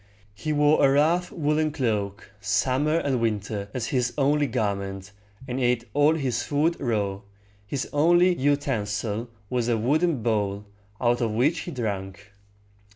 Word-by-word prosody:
He 155 +9 -4
wore 150 +1 +3
a 135 - +6
rough 165 +6 +2
woolen 155 0 0
cloak, 105 -6 -2
summer 130 +9 +1
and 135 -7 0
winter, 105 -2 -2
as 120 -2 -3
his 125 -2 0
only 145 +1 +2
garment, 100 -4 -3 0.4
and 125 0 -3
ate 120 -1 +1
all 145 +2 +4
his 135 -6 -1
food 155 +4 +1
raw. 105 -6 -1 0.5
His 135 +5 -3
only 175 +5 +4
utensil 115 -6 -1 0.2
was 120 +1 -1
a 120 -2 +2
wooden 145 +3 +1
bowl, 105 -3 -1 0.3
out 120 0 +1
of 115 -2 0
which 140 +10 +2
he 175 - -6
drank. 100 - -5
125 Hz, 145 wpm, -25 LUFS, 105-145 Hz, 0.5 s, a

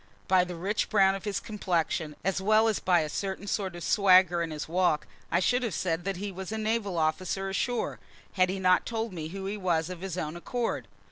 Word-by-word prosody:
By 185 -1 +5
the 180 -1 -6
rich 195 +6 -1
brown 195 -2 +4
of 195 +1 -6
his 205 -2 -1
complexion, 170 -7 -2
as 190 +1 0
well 215 +3 +4
as 220 - +1
by 180 -2 +3
a 155 - -2
certain 190 +5 -4
sort 195 -3 -2
of 175 - -7
swagger 185 -2 +5
in 165 - -2
his 150 -1 -5
walk, 170 -3 +1 0.3
I 170 - +3
should 245 +7 +2
have 230 -6 -2
said 170 -1 -1
that 195 -2 -2
he 200 +2 -4
was 190 +1 -7
a 220 - -2
naval 215 -4 -1
officer 180 +4 0
ashore, 240 +5 -1 0.3
had 185 -1 +3
he 190 - -2
not 185 -1 +3
told 225 -2 -3
me 160 -3 -5
who 190 +3 -6
he 200 +2 -3
was 175 -3 0
of 180 -2 -8
his 190 -2 -4
own 155 -2 -3
accord. 235 +7 -3
185 Hz, 225 wpm, -28 LUFS, 175-200 Hz, 0.3 s, By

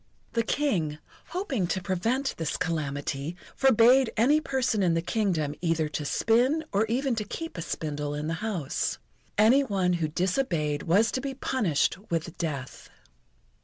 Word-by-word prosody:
The 230 - +2
King, 200 - 0 0.3
hoping 305 - -2
to 185 +2 -1
prevent 225 +10 -1
this 160 -2 -2
calamity, 145 -2 -2 0.2
forbade 255 0 +5
any 285 +8 +4
person 255 -7 0
in 175 -3 +3
the 165 - +1
Kingdom 175 -7 0
either 165 -2 +1
to 150 0 -4
spin 250 - +2
or 210 +2 +2
even 260 +3 0
to 215 - 0
keep 330 +9 -6
a 170 - -4
spindle 150 -2 -3
in 150 +1 -3
the 160 - -1
house. 195 -11 -2 0.4
Any 235 +7 +6
one 190 -7 +1
who 155 - +2
disobeyed 170 - 0
was 200 +7 +3
to 260 - -2
be 270 0 -4
punished 190 - 0
with 165 0 -2
death. 140 -6 -4
190 Hz, 155 wpm, -27 LUFS, 160-250 Hz, 0.4 s, Any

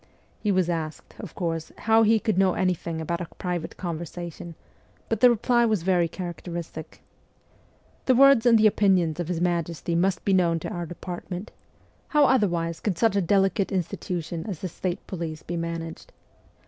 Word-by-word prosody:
He 210 - 0
was 185 -3 +2
asked, 160 -3 -4
of 205 -8 -9
course, 165 -2 -3
how 225 +1 +4
he 220 0 +4
could 215 -1 0
know 190 -2 +3
anything 175 -3 -1
about 170 +2 -3
a 175 - -4
private 175 -3 -4
conversation, 170 0 -6 0.5
but 225 - 0
the 250 - +7
reply 240 +1 +2
was 215 -7 +1
very 180 -2 +2
characteristic: 170 -2 -7 0.5
' - - -34
The 260 - +5
words 275 -2 +6
and 230 -1 +7
the 220 - +4
opinions 185 -6 +3
of 175 - -2
his 175 -2 -2
Majesty 170 -1 -1
must 175 +1 +1
be 195 - +3
known 170 -3 +3
to - - -4
our 175 -1 -4
depart 175 +1 -7
ment. 185 +3 -5 0.6
How 295 -2 +4
otherwise 175 -10 +1
could 195 -6 -2
such 225 -3 +2
a 200 - +3
delicate 195 +2 +2
institution 175 -2 -3
as 190 -7 -5
the 185 - -2
state 180 +2 -4
police 165 -4 -5
be 175 - -5
managed 165 -1 -5
180 Hz, 175 wpm, -25 LUFS, 170-200 Hz, 0.6 s, the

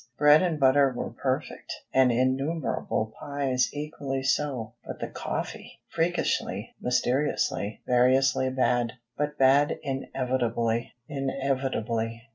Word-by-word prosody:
Bread 150 +1 +7
and 170 -4 0
butter 135 0 +5
were - - -3
perfect, - - -3 0.2
and 130 -1 +5
innumerable 130 -3 0
pies 135 -3 0
equally 145 -2 -4
so. 135 -5 -1
But - - -7
the - - -2
coffee! - - -5
Freakishly, 165 - -1
mysteriously, 125 -2 0
variously 130 +1 +3
bad; 120 -3 +1 0.2
but 150 +1 -2
bad 135 +2 +4
inevitably. 125 -4 -1
130 Hz, 95 wpm, -27 LUFS, 125-145 Hz, 0.2 s, Bread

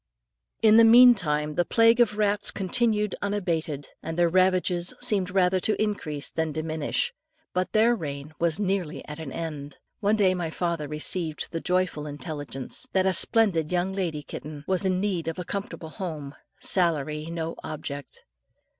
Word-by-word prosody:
In 220 0 +7
the 230 - +8
meantime 195 -11 +6
the 175 - +2
plague 230 +4 +4
of 210 -3 +3
rats 205 -1 +2
continued 210 0 0
unabated, 165 -8 -2
and 165 0 -5
their 175 -1 +3
ravages 185 -1 +2
seemed 195 -4 +1
rather 185 0 +2
to 215 +4 0
increase 160 -9 -2
than 160 -1 -1
diminish. 160 - -2 0.4
But 185 0 -1
their 225 +2 +4
reign 145 -5 -6
was 170 +1 +1
nearly 190 -5 -2
at 150 +1 -7
an 155 -4 -6
end. 150 -3 -6 0.2
One 210 0 +2
day 195 -3 +3
my 175 -3 -3
father 170 -2 -2
received 155 +2 -3
the 165 -1 -3
joyful 180 -5 -1
intelligence 145 -3 -4
that 190 -1 +2
a 190 - +3
splendid 185 -8 +2
young 180 +2 0
lady 170 -6 -3
kitten, 150 0 -8
was 190 0 +1
in 185 -1 +1
need 185 -5 -1
of 165 - -3
a 180 - -5
comfortable 195 -4 -5
home 155 -5 -6 0.3
salary 155 -4 +1
no 165 -1 -4
object. 145 -2 -7
175 Hz, 160 wpm, -26 LUFS, 155-200 Hz, 0.4 s, the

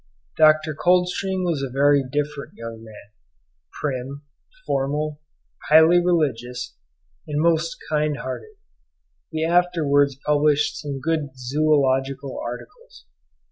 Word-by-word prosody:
Dr. 155 0 +4
Coldstream 180 +3 +1
was 165 -5 -1
a 135 - -3
very 140 +2 +3
different 145 +2 -4
young 115 -1 -8
man, 110 -2 -14 0.7
prim, 140 0 -4 0.4
formal, 150 +2 -2 0.5
highly 160 +3 +6
religious, 125 -8 -1 0.5
and 150 -1 -2
most 165 0 +1
kind 150 -1 0
hearted; 130 - -7 0.7
he 160 -1 -2
afterwards 160 -6 +2
published 150 0 +2
some 140 -3 -5
good 145 -2 -2
zoological 135 0 0
articles. 120 - -9
145 Hz, 100 wpm, -22 LUFS, 135-160 Hz, 0.7 s, highly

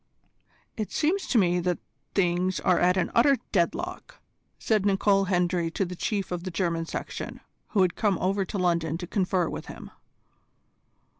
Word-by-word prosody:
"It 215 -2 -3
seems 350 +6 0
to 250 - +2
me 180 -4 +3
that 175 0 0 0.4
things 185 0 +1
are 180 - +2
at 180 +1 +3
an 180 - 0
utter 270 +4 +5
deadlock," 285 - -2 0.4
said 215 -3 +1
Nicol 195 0 +3
Hendry 175 -2 +1
to 190 +4 -1
the 180 0 -6
Chief 200 +1 -2
of 175 -1 -3
the 185 - -4
German 165 -2 -1
section, - - -5 0.3
who 200 -4 +3
had 180 -2 0
come 205 -3 +1
over 195 +2 0
to 190 - -5
London 170 -3 +1
to 175 - -6
confer 185 -2 0
with - - -6
him. - - -9
185 Hz, 165 wpm, -27 LUFS, 175-200 Hz, 0.4 s, utter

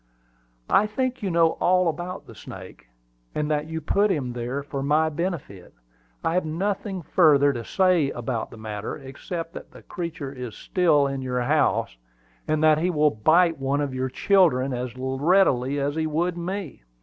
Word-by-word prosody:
"I 210 - +5
think 255 +3 -2
you 200 - -1
know 165 -1 +4
all 180 0 +3
about 175 +4 -4
the - - -12
snake, 95 - -11 0.5
and 150 0 -1
that 150 0 0
you 160 0 -4
put 200 +7 +2
him 135 -9 -1
there 125 +4 -4
for 140 -1 -5
my 150 +3 +2
benefit. 150 - -5 0.5
I 165 - 0
have 180 - +1
nothing 190 +3 -3
further 145 -4 +4
to 120 -2 -5
say 180 -2 +2
about 120 -2 -3
the - - -12
matter, 110 -1 -5
except 165 +5 -7
that - - -9
the - - -14
creature 165 -6 -5
is 125 -4 -7
still 165 -7 +2
in 135 -1 -3
your 125 -1 -2
house, 145 - +1 0.5
and 155 0 +1
that 155 -1 +5
he 175 +3 +1
will 150 -3 +3
bite 165 +8 +3
one 135 +1 0
of 145 -2 -2
your 130 0 -2
children 140 -7 +3
as 125 0 -4
readily 135 0 +2
as 140 +1 -1
he 160 0 -1
would 170 +3 -1
me. 180 -2 -5
150 Hz, 175 wpm, -24 LUFS, 130-175 Hz, 0.5 s, I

